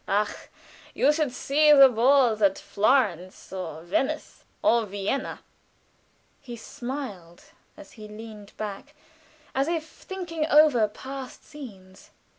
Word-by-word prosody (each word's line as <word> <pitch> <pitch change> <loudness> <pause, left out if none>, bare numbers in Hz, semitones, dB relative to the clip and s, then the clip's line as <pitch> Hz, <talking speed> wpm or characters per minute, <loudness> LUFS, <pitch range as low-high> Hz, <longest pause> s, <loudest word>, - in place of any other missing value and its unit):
"Ah, 205 +1 0 0.6
you 290 - +4
should 300 -4 0
see 295 +4 +3
the 275 -2 +9
balls 245 -2 +3
at 195 -2 +3
Florence, 200 - 0
or 165 -4 -6
Venice, 265 - -2 0.2
or 235 0 +4
Vienna!" 200 +7 -3 1.0
He 240 -2 -9
smiled 230 -8 -7 0.3
as 195 - -13
he 215 -1 -11
leaned 210 -1 -11
back, 215 +8 -7 0.6
as 270 +2 0
if 325 -2 -2
thinking 335 -5 -5
over 295 -8 +5
past 260 +4 -9
scenes. 195 -10 -12
240 Hz, 115 wpm, -26 LUFS, 200-285 Hz, 1.0 s, the